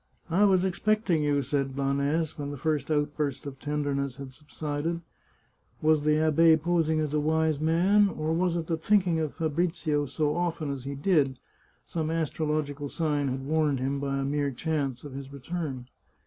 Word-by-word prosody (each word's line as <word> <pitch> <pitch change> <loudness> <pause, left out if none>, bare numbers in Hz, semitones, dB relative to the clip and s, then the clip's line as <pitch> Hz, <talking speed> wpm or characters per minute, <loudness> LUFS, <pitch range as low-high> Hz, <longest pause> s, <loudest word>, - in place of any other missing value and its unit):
" - - -35
I 195 +5 +5
was 190 -2 +4
expecting 190 -2 +1
you," 145 -1 +1
said 135 0 -1
Blanes 140 +3 0
when 145 -1 -5
the 145 - -5
first 150 0 -1
out 145 -1 0
burst 145 -1 -2
of 135 -1 -7
tenderness 140 -2 -2
had 135 -1 -9
subsided. 150 +3 -4 0.8
Was 155 -1 +3
the 150 0 +3
abbe 160 +1 +5
posing 160 -1 +1
as 150 -1 -1
a 150 - +2
wise 155 0 +1
man, 185 +6 +4
or 155 -2 -2
was 175 +1 +1
it 170 -1 -2
that 160 -1 -3
thinking 185 -6 +3
of 155 -2 -2
Fabrizio 160 -2 0
so 150 +2 0
often 165 -4 -1
as 135 -2 -6
he 140 0 -4
did, 140 -4 +2 0.5
some 160 -2 -2
astrological 150 -2 -1
sign 150 -3 0
had 130 +1 -3
warned 150 -2 +1
him, 135 +2 -1
by 140 0 -1
a 135 - -1
mere 145 0 0
chance, 140 -2 -2
of 145 -2 -8
his 135 0 -7
return 140 -2 -5
150 Hz, 180 wpm, -28 LUFS, 140-165 Hz, 0.8 s, I